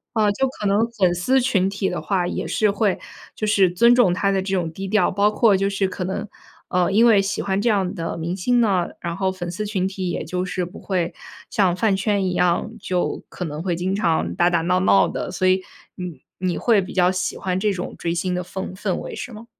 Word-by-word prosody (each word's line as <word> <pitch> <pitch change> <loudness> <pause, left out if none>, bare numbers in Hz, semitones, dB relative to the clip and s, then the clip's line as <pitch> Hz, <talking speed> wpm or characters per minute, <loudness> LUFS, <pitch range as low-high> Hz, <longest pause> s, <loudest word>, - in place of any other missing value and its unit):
呃， 215 -2 +3
就 265 +7 0
可 235 -5 -7
能 205 +3 +2
粉 190 -6 +2
丝 250 +10 +2
群 210 -7 +1
体 195 0 -2
的 - - -3
话， 185 -4 0
也 - - -3
是 215 -2 +2
会 200 -1 0 0.4
就 215 - -2
是 200 -3 +4
尊 235 +7 +5
重 240 -8 +4
他 195 +2 +1
的 195 -1 +1
这 190 0 -2
种 170 -3 -1
低 195 +3 -5
调， 215 +2 +2
包 200 +2 +3
括 215 -1 +4
就 195 +1 +1
是 195 -1 0
可 185 0 -5
能， 190 +3 -3 0.4
呃， 180 0 +1
因 220 +4 +5
为 220 -4 +6
喜 195 +2 -2
欢 195 0 0
这 235 - +2
样 195 -3 +1
的 165 -4 -4
明 170 +2 -3
星 240 +6 +1
呢， 195 -7 +2
然 170 -1 -3
后 190 0 0
粉 175 -2 -5
丝 210 +4 -4
群 190 -3 -1
体 190 -1 -4
也 - - -3
就 180 +3 -2
是 185 -1 -2
不 175 - -11
会 180 -4 -2 0.4
像 185 -4 +2
饭 205 +1 +2
圈 200 0 0
一 185 - 0
样， 180 +4 +1
就 180 -3 -2
可 180 - -5
能 150 -1 -5
会 175 -1 -1
经 185 +3 -1
常 170 -6 0
打 175 0 +3
打 170 -2 +1
闹 180 +2 +1
闹 190 +1 +4
的， - - -4
所 185 +1 0
以 185 0 +3 0.3
你 180 -6 -7 0.2
你 185 -2 -1
会 225 -4 +3
比 185 - -7
较 180 -1 +3
喜 185 -1 -2
欢 185 -1 -2
这 210 +2 +1
种 180 -2 -5
追 170 - -2
星 180 +2 -1
的 180 0 -2
氛 185 +1 -6
氛 190 -1 -2
围， - - -6
是 250 - -6
吗？ 220 +1 -10
190 Hz, 265 characters per minute, -22 LUFS, 180-205 Hz, 0.4 s, 为